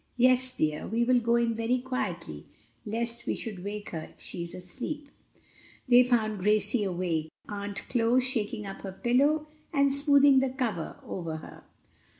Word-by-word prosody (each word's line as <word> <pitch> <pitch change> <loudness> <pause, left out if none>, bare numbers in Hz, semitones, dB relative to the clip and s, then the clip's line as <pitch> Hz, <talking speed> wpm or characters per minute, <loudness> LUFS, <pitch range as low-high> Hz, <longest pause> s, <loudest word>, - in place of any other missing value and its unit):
"Yes, 255 +1 +4
dear; 155 -1 0
we 230 +2 +1
will 250 +1 +4
go 235 0 +2
in 235 -1 +2
very 230 +3 0
quietly 185 - -4 0.4
lest 235 +2 -2
we - - 0
should 205 -6 -6
wake 205 +1 -5
her 160 -2 -5
if - - -26
she 175 - -3
is 170 0 -5
asleep." 265 - -6 0.8
They 250 0 +7
found 220 -4 +1
Gracie 210 +3 +2
awake, 175 -4 -1 0.2
Aunt 200 -1 -3
Chloe 240 0 +3
shaking 225 -5 -1
up 195 0 -7
her 190 -1 -6
pillow 280 +9 +2 0.3
and 280 -2 +3
smoothing 280 -1 +5
the 265 0 +1
cover 235 -10 -3
over 165 -3 -4
her. 155 - -12
230 Hz, 160 wpm, -28 LUFS, 195-255 Hz, 0.8 s, They